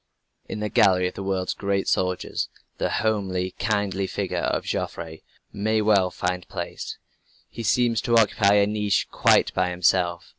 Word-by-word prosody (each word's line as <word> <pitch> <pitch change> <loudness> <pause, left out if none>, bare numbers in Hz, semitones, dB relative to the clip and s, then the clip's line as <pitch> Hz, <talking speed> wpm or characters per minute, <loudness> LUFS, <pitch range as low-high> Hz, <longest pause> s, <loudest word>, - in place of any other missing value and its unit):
In 105 - -5
the 105 - -2
gallery 90 -2 +4
of 90 - -6
the - - -7
world's 95 -1 -1
great 100 -1 -1
soldiers, 90 0 -1 0.3
the - - 0
homely, 95 -4 -1
kindly 100 -3 0
figure - - -3
of - - -1
Joffre 80 -1 -4 0.3
may 110 +2 0
well 105 -3 +3
find 90 0 -3
place. - - -6 0.5
He 115 - -7
seems 115 0 +2
to 120 -2 +2
occupy 105 -2 +4
a 100 -1 +5
niche 105 -1 0
quite - - +3
by 90 -1 +1
himself. 90 -1 +1
100 Hz, 155 wpm, -24 LUFS, 90-105 Hz, 0.5 s, a